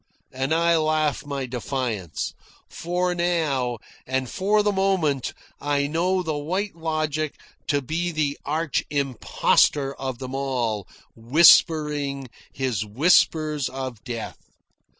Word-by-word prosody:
And 135 +2 -2
I 170 +1 +3
laugh 155 -2 0
my 140 -2 -3
defiance; 120 - -3 0.3
for 180 +1 -1
now, 155 -9 0 0.3
and 130 0 -1
for 205 - +1
the 205 - +2
moment, 190 -9 +1 0.3
I 145 -1 0
know 180 +5 0
the 160 -3 -2
White 185 +7 -2
Logic 155 -2 -2 0.3
to 145 -2 +1
be 170 +6 -2
the 150 -3 0
arch 155 +2 -1
impostor 140 0 +2
of 130 -2 -5
them 130 +1 -7
all, 120 -7 -1 0.3
whispering 145 +1 +4 0.2
his 125 -6 -1
whispers 150 - +2
of 130 -4 -6
death. 120 -4 -6
145 Hz, 115 wpm, -24 LUFS, 130-165 Hz, 0.3 s, whispering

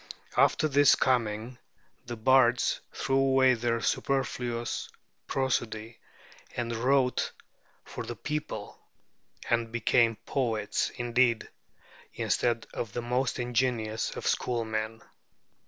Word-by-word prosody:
After 155 - +4
his 145 -1 +5
coming 120 -1 0 0.5
the 120 - -4
bards 125 +1 +3
threw 135 0 0
away 135 -1 +4
their 115 -1 -1
superfluous 120 -3 -1 0.4
prosody 115 -4 -2 0.6
and 120 -1 -2
wrote 125 +2 +2 0.5
for - - -6
the - - -4
people, 150 0 -5 0.7
and 115 -1 0
became 120 0 +3
poets 115 -6 -1
indeed, 120 -1 +1 0.7
instead 120 -2 0
of 110 -4 -4
the 120 - -3
most 125 +2 0
ingenious 120 -3 0
of - - -6
schoolmen. 110 -2 -1
120 Hz, 100 wpm, -29 LUFS, 115-130 Hz, 0.7 s, his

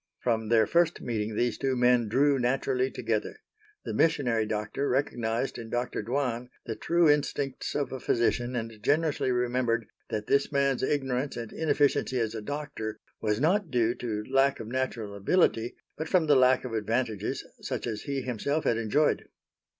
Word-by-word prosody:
From 110 -3 0
their 115 -2 +5
first 170 +6 +2
meeting 110 -2 -3
these 120 +1 0
two 135 -1 0
men 125 -2 +3
drew 135 +5 +3
naturally 130 +1 +1
together. 115 -4 -2 0.5
The - - -3
missionary 120 -9 +2
doctor 110 +6 -2
recognized 120 -2 -1
in 115 -1 -8
Dr. 120 -1 -2
Dwan 125 +1 -2 0.2
the 110 - -3
true 170 +5 +2
instincts 145 -2 0
of 145 -1 -1
a 130 - -4
physician 120 +1 0
and 115 -2 -5
generously 145 +2 +1
remembered 120 -2 +1 0.2
that 105 -1 -3
this 140 +4 +2
man's 140 -2 +1
ignorance 135 -1 -1
and 115 -2 -6
inefficiency 145 -4 +1
as 115 -2 -1
a 110 - -5
doctor 145 -3 -5 0.2
was 105 -1 0
not 180 +5 +2
due 120 -3 +2
to 110 -4 -4
lack 135 +1 +3
of 115 - -6
natural 120 -4 -3
ability 115 - +2 0.2
but 160 +1 -5
from 180 -4 +3
the 150 -2 +5
lack 130 0 +4
of 125 - -5
advantages 110 0 -1 0.2
such - - -3
as 110 -3 -3
he 140 -1 -3
himself 135 +6 -1
had 115 - +2
enjoyed. 115 +7 +1
125 Hz, 165 wpm, -28 LUFS, 115-140 Hz, 0.5 s, their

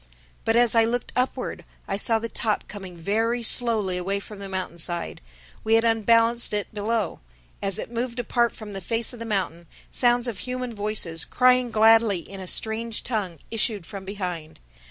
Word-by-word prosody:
But 225 - +2
as 240 -1 +6
I 230 -1 +5
looked 240 +2 -1
upward, 250 +1 -2 0.2
I 195 - -1
saw 225 +3 +2
the 225 +1 -3
top 215 -2 -1
coming 190 -4 -9
very 225 +7 0
slowly 220 -6 +2
away 195 +3 -1
from 205 0 -11
the 200 -1 -7
mountainside. 175 -2 -3 0.4
We 220 +1 +3
had 225 - +4
unbalanced 230 +1 +3
it 205 0 -2
below. 215 -1 -1 0.4
As 195 0 -1
it 225 - -5
moved 240 +1 -3
apart 240 0 +1
from 215 -2 -10
the 195 -1 -6
face 230 +6 -2
of 240 - -10
the 230 - -5
mountain, 185 -6 -2 0.2
sounds 245 0 +3
of 225 -5 -4
human 250 -1 -4
voices, 205 -6 0
crying 250 -1 +3
gladly 225 -2 +5
in 195 +4 -9
a 185 - -7
strange 220 +3 0
tongue, 205 -8 -2
issued 215 -4 +1
from 195 +2 -8
behind. 180 -5 -5
220 Hz, 175 wpm, -25 LUFS, 195-235 Hz, 0.4 s, as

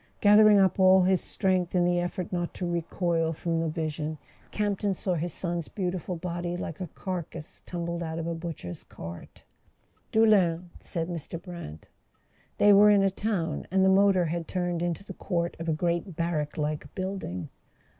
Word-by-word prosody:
Gathering 210 0 +7
up 190 -1 +3
all 190 0 +7
his 185 0 +3
strength 185 -2 0
in 175 -1 +4
the 175 0 +2
effort 175 0 -3
not 175 -1 -2
to 180 - -3
recoil 170 -1 0
from 165 +1 -1
the 165 0 0
vision, 155 -1 -3 0.3
Campton 205 -1 -1
saw 185 +1 -1
his 175 +1 -2
son's 170 -1 -3
beautiful 185 -2 -3
body 175 0 -3
like 165 -1 -6
a 180 - -3
carcass 170 -2 -6
tumbled 170 -1 -3
out 160 -1 -4
of 165 - -3
a 170 - -2
butcher's 165 - -6
cart... 85 +1 -10 0.7
"Doullens," 185 -6 +3
said 165 -3 -3
Mr. 170 -1 -4
Brant. 170 - -9 0.7
They 205 0 +6
were 205 +1 +8
in 205 -1 +5
a 195 - +3
town, 195 -4 -2
and 190 0 +3
the - - +5
motor 190 -2 +4
had 165 +1 -3
turned 175 -2 -2
into 175 +2 -2
the 190 - -7
court 170 -2 -2
of 165 0 -3
a - - +3
great 170 +3 -1
barrack 165 -3 -2
like 150 0 -3
building. 185 - -4
175 Hz, 175 wpm, -28 LUFS, 165-190 Hz, 0.7 s, were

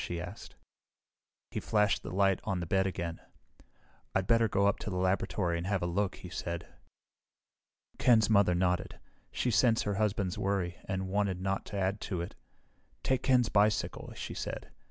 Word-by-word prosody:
she 85 - -3
asked. 90 +5 -8 1.0
He - - -2
flashed 105 -1 +2
the - - -7
light 95 0 +2
on 100 -4 -1
the 85 - -3
bed 95 +2 +2
again. 85 -3 -4 1.0
"I'd 95 -1 +2
better 115 +1 +4
go 100 -1 +2
up 100 - +2
to - - -5
the 95 - -3
laboratory 90 -1 0
and 85 - -4
have 95 -3 0
a - - +1
look," 95 +3 0
he 90 - -10
said. 85 -2 -4 1.3
Ken's 110 -4 +5
mother 100 -5 +4
nodded. 90 0 0 0.3
She 125 - 0
sensed 115 +1 +4
her 105 - -1
husband's 100 -3 0
worry, 95 -3 -1
and 95 0 -2
wanted 100 -1 0
not 95 +1 -2
to 100 - -5
add 100 +2 0
to 90 - -3
it. 85 +2 -5 0.7
"Take 130 -1 +1
Ken's 125 -3 +3
bicycle," 105 +1 +1
she - - -5
said. - - -5
95 Hz, 175 wpm, -31 LUFS, 90-105 Hz, 1.3 s, Ken's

